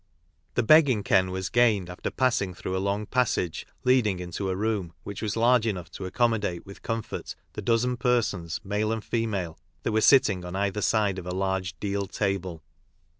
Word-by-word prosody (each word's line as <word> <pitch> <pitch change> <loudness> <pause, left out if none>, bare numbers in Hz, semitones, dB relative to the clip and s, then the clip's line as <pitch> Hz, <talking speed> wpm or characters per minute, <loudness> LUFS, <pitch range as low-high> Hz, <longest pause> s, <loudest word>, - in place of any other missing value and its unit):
The 120 - +2
"begging 135 -5 +5
ken" 95 -1 +3
was 95 0 -3
gained 110 -6 +3
after 90 0 -4
passing 115 -8 0
through 95 - -4
a 95 - 0
long 100 +2 -1
passage 110 -8 0 0.2
leading 125 -7 +3
into 90 +2 -4
a 95 - -1
room, 100 -4 -1
which 100 -1 -6
was 110 0 -2
large 120 0 +4
enough 95 -5 -3
to 95 - -7
accommodate 105 -5 0
with 100 - -12
comfort 115 -1 -4 0.2
the 105 - -5
dozen 120 +4 +1
persons, 115 - 0
male 105 +2 -1
and 110 -1 -2
female, 100 -8 -2 0.2
that - - 0
were 110 0 +2
sitting 110 -9 +5
on 90 +1 -6
either 100 +1 -1
side 105 -3 +1
of 90 - -9
a 90 - -3
large 95 -3 -2
deal 100 -1 -2
table. 95 -6 -2
100 Hz, 180 wpm, -27 LUFS, 95-115 Hz, 0.2 s, begging